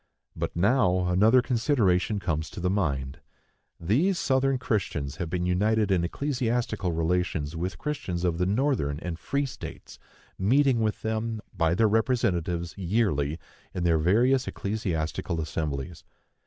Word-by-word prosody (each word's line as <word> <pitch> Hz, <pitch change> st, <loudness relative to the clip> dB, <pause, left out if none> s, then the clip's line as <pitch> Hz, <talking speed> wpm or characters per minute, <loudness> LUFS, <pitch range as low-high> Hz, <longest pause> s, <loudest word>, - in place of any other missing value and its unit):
But -, -, -3 dB
now 90 Hz, -2 st, +2 dB
another 110 Hz, +8 st, +5 dB
consideration 115 Hz, -7 st, +1 dB
comes 80 Hz, -4 st, -2 dB
to -, -, -8 dB
the 90 Hz, +1 st, 0 dB
mind. 70 Hz, -9 st, -1 dB, 0.6 s
These 140 Hz, -, +2 dB
Southern 135 Hz, -2 st, +2 dB
Christians 90 Hz, -, -2 dB
have 85 Hz, -3 st, -3 dB
been 90 Hz, +1 st, -1 dB
united 105 Hz, +3 st, +2 dB
in 90 Hz, -3 st, +2 dB
ecclesiastical 120 Hz, -, -1 dB
relations 80 Hz, -2 st, -1 dB
with 90 Hz, +3 st, -3 dB
Christians 120 Hz, -13 st, -3 dB
of 85 Hz, -2 st, 0 dB
the 90 Hz, -, +1 dB
northern 105 Hz, -, +1 dB
and 85 Hz, -1 st, -5 dB
free 140 Hz, 0 st, -1 dB
states, 130 Hz, -3 st, -9 dB, 0.4 s
meeting 130 Hz, +5 st, +3 dB
with 110 Hz, -1 st, -1 dB
them, 110 Hz, 0 st, -2 dB, 0.2 s
by 85 Hz, 0 st, +2 dB
their 110 Hz, +3 st, +4 dB
representatives, 90 Hz, -7 st, 0 dB
yearly, 85 Hz, -7 st, 0 dB, 0.4 s
in 90 Hz, -, -2 dB
their 85 Hz, -2 st, +3 dB
various 120 Hz, +11 st, +3 dB
ecclesiastical 85 Hz, -, -2 dB
assemblies. 75 Hz, 0 st, -4 dB
95 Hz, 135 wpm, -27 LUFS, 85-115 Hz, 0.6 s, another